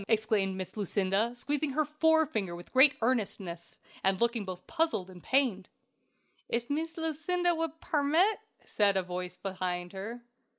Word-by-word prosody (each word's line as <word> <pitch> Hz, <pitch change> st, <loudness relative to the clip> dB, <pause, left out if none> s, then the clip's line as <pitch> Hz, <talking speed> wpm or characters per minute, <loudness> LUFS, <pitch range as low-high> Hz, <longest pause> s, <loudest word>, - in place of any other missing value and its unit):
exclaimed 215 Hz, -4 st, +1 dB
Miss 185 Hz, -1 st, -5 dB
Lucinda, 200 Hz, +2 st, +1 dB
squeezing 290 Hz, +3 st, -1 dB
her 310 Hz, +2 st, +2 dB
forefinger 305 Hz, -, +2 dB
with 175 Hz, 0 st, -12 dB
great 265 Hz, +2 st, +7 dB
earnestness, 195 Hz, -8 st, -2 dB, 0.2 s
and 190 Hz, 0 st, +2 dB
looking 235 Hz, -2 st, +1 dB
both 185 Hz, -1 st, -7 dB
puzzled 230 Hz, -, -1 dB
and 180 Hz, -1 st, -12 dB
pained. 245 Hz, -8 st, +1 dB, 0.8 s
"If 235 Hz, +3 st, -1 dB
Mees 320 Hz, +3 st, -2 dB
Lucinda 330 Hz, +3 st, 0 dB
would 325 Hz, -1 st, -3 dB
pairmit?" 320 Hz, +8 st, +2 dB, 0.3 s
said 200 Hz, -2 st, +2 dB
a 190 Hz, -, +1 dB
voice 180 Hz, 0 st, -5 dB
behind 180 Hz, -2 st, -3 dB
her. 225 Hz, +5 st, -6 dB
230 Hz, 140 wpm, -30 LUFS, 190-300 Hz, 0.8 s, great